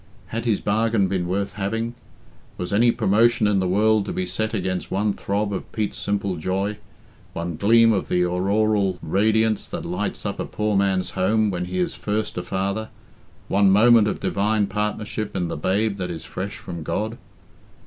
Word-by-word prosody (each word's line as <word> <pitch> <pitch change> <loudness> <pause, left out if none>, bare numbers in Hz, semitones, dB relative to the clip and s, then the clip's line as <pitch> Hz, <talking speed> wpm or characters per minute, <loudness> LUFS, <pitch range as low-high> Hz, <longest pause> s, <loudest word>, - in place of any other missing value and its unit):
Had 115 +1 -3
his 110 -4 +2
bargain 110 -1 +1
been 90 -2 -1
worth 100 +2 -1
having? 115 +4 -2 0.6
Was 90 +3 -4
any 115 +4 +5
promotion 115 +1 +3
in 105 -2 +3
the 95 - 0
world 105 +2 +3
to - - -4
be 95 - -2
set 110 +5 -2
against 95 -4 -2
one 100 +2 0
throb 100 +1 -2
of 95 - -5
Pete's 105 -2 -2
simple 100 -2 -1
joy, 95 +5 -2 0.6
one 85 0 -4
gleam 115 +4 +5
of 95 - -1
the 90 0 +2
auroral 100 +1 +1
radiance 110 +4 +2
that - - -5
lights - - -3
up - - -3
a - - -2
poor 105 -1 -1
man's 95 -2 +1
home 105 +3 +2
when 90 -1 -2
he 90 +1 -4
is 90 - 0
first 105 +1 -2
a 90 - -2
father, 100 +4 -2 0.6
one 100 0 +4
moment 110 +2 +6
of - - -2
divine 105 +1 +1
partnership 105 +1 -3
in 90 -2 -1
the - - -3
babe 100 +6 0
that 90 -2 -3
is 80 -2 -6
fresh 100 +4 -5
from 90 -7 -7
God? 110 +9 -3
100 Hz, 180 wpm, -23 LUFS, 95-110 Hz, 0.6 s, moment